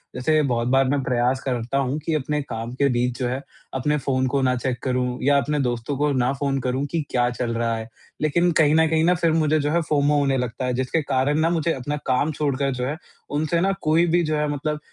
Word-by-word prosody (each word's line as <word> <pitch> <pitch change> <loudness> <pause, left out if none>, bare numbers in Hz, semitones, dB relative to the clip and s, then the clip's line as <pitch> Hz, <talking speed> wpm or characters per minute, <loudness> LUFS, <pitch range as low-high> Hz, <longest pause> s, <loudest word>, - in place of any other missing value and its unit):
जैसे 155 +4 +2
बहुत 120 0 0
बार 135 0 +4
मैं 140 -1 +1
प्रयास 125 +1 +1
करता 125 0 -2
हूँ 135 +2 0
कि 160 +2 -3
अपने 150 +1 -1
काम 115 -3 -5
के 140 +2 +2
बीच 125 0 0
जो 125 - 0
है, 130 +2 -3 0.3
अपने 150 +3 0
फ़ोन 130 -1 0
को 140 - +2
ना 125 -1 +2
चेक 125 0 -2
करूँ 125 -1 -1
या 140 +1 +4
अपने 150 +1 0
दोस्तों 120 +1 -2
को 145 0 +1
ना 125 -1 +1
फ़ोन 135 -1 -1
करूँ 130 +3 -1
कि 165 - 0
क्या 120 -1 +2
चल 120 -1 -3
रहा 115 0 0
है। 110 - -6 0.3
लेकिन 170 +4 +2
कहीं 155 0 +4
न 160 0 +4
कहीं 160 0 +2
ना 175 +2 +4
फिर 170 -2 +1
मुझे 155 -1 +2
जो 145 +1 0
है 170 - +2
फ़ोमो 145 0 +3
होने 135 -2 +1
लगता 125 +1 -3
है। 125 - 0
जिसके 130 +6 0
कारण 145 +2 0
ना 165 - +3
मुझे 165 -1 0
अपना 140 +3 -3
काम 135 +3 +1
छोड़कर 140 -2 -1
जो 125 - -2
है, 150 +3 -3 0.3
उनसे 155 +3 0
ना 195 +1 +2
कोई 160 +3 +3
भी 175 +1 +3
जो 155 -1 0
है 150 0 0
मतलब 150 +1 -2
140 Hz, 245 wpm, -23 LUFS, 125-150 Hz, 0.3 s, बार